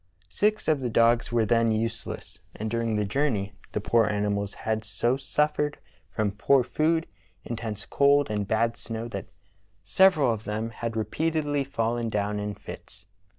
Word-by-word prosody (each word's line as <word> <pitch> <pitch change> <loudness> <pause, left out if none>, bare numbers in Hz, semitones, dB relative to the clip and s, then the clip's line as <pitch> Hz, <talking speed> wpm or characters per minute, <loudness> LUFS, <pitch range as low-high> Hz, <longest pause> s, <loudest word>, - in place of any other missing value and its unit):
Six 215 +1 +1
of 155 -3 +3
the 125 -2 -2
dogs 115 +1 +3
were 115 -2 +2
then 115 0 +3
useless, 110 -4 -4 0.2
and 110 0 -4
during 115 -1 0
the 105 0 +1
journey 105 -5 0 0.2
the - - 0
poor 115 +1 +3
animals 100 -1 -1
had 110 0 0
so 120 +3 0
suffered 150 +2 0 0.3
from 105 -2 -1
poor 125 +6 +3
food, 160 +5 +1 0.4
intense 110 -3 -5
cold, 140 0 +4
and 105 -2 -1
bad 115 +2 +1
snow 115 0 -5
that - - -6 0.6
several 180 -10 +4
of 110 -1 -7
them 110 +2 -3
had 115 0 -4
repeatedly 150 +4 0
fallen 120 -3 -1
down 105 -1 -1
in 105 0 -3
fits. 95 -1 -11
115 Hz, 155 wpm, -27 LUFS, 105-140 Hz, 0.6 s, cold